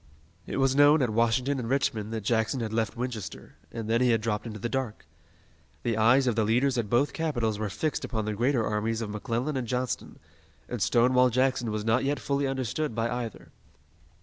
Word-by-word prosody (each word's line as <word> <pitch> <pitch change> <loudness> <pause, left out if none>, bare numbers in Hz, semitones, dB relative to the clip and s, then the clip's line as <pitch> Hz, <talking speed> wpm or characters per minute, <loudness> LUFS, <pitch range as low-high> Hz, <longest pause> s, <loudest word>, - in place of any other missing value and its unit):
It - - -3
was 135 0 +2
known 145 +1 +6
at 120 - 0
Washington 115 +5 +1
and 115 -2 -4
Richmond 115 -5 0
that 110 -1 -3
Jackson 115 +3 +1
had 110 -2 -3
left 115 0 -1
Winchester, 115 -8 -5 0.2
and 115 -2 -5
then 115 +2 +2
he 125 - +4
had 115 -1 +3
dropped 110 +1 -2
into 110 -2 -6
the 110 - -3
dark. 125 - -3 0.8
The 115 -2 0
eyes 120 +5 +4
of 120 -3 +1
the 115 - +2
leaders 125 +5 +2
at 105 -3 -2
both 135 +6 +2
capitals 120 -10 -1
were 110 -1 -2
fixed 155 +10 -2
upon 110 -4 -2
the 110 - -2
greater 120 +2 +1
armies 110 +2 -1
of 105 -2 -4
McClellan 115 +7 -2
and 125 -2 -3
Johnston, 125 +1 -3 0.5
and 120 -4 -5
Stonewall 125 +4 +4
Jackson 130 -1 +1
was 105 0 -3
not 115 +3 +2
yet 145 +1 0
fully 140 0 -1
understood 135 0 -2
by 115 0 -1
either. 120 -2 -5
120 Hz, 205 wpm, -28 LUFS, 110-130 Hz, 0.8 s, known